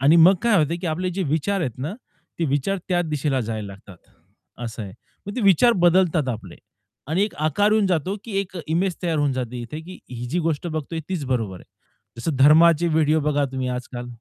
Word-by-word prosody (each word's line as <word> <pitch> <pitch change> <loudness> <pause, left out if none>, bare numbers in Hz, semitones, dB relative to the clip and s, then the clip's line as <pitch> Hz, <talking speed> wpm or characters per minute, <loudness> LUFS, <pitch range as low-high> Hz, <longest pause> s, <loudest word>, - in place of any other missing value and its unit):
आणि 145 +5 +5
मग 170 +4 +7
काय 235 -3 +4
होत 155 0 +1
की 180 - -3
आपले 175 +3 -1
जे 190 +2 -2
विचार 165 +6 0
आहेत 125 -9 -3
ना, 150 +9 -4 0.4
ते 170 - +1
विचार 145 +8 0
त्या 180 -1 +2
दिशेला 150 -4 -1
जायला 110 -2 -4
लागतात. 100 -1 -12 0.7
असं 115 -1 -5
आहे. 100 -2 -8 0.3
मग 205 - -5
ते - - -1
विचार 200 +5 +5
बदलतात 170 -5 +3
आपले 110 -7 -5 0.5
आणि 170 +6 +1
एक 210 - -6
आकार 155 +8 +2
येऊन 215 -2 +3
जातो 185 +2 0
की 230 - -8
एक 190 -1 -7
इमेज 175 +3 0
तयार 165 -3 0
होऊन 145 -2 +2
जाते 125 -1 -4
इथे 120 +7 -7
की 180 +3 -11
ही 125 -1 -5
जी 165 +8 -1
गोष्ट 165 0 -1
बघतोय 160 0 -4
तीच 180 -7 -2
बरोबर 115 -7 -2
आहे. - - -15 0.5
जसं 140 +4 -2
धर्माचे 160 +4 +6
व्हिडिओ 155 -1 +2
बघा 145 -1 +1
तुम्ही 130 -1 -2
आज-काल. 125 0 -5
155 Hz, 205 wpm, -23 LUFS, 130-180 Hz, 0.7 s, मग